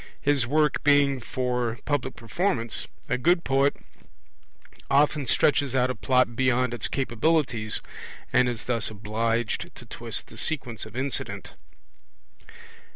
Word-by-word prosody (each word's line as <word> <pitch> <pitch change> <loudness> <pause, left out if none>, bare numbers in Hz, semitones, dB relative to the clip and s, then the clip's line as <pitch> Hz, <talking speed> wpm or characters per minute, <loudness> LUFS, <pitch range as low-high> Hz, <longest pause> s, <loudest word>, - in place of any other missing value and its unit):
His 140 -4 +2
work 150 +2 +1
being 145 -2 +4
for 125 -1 -2
public 145 -3 -1
performance, 120 - -2 0.2
a 125 - -1
good 170 +5 +3
poet 135 +1 +2 1.1
often 145 0 +3
stretches 140 +1 +2
out 130 0 +2
a - - -5
Plot 130 -2 +2
beyond 125 -1 +1
its 120 - -1
capabilities, 125 -3 0 0.5
and 125 -1 +4
is 115 -4 -4
thus 115 -3 +1
obliged 110 +2 -2
to - - -11
twist - - -3
the - - -14
sequence 125 -9 0
of 110 - -14
incident. 130 0 -4
130 Hz, 125 wpm, -26 LUFS, 115-140 Hz, 1.1 s, being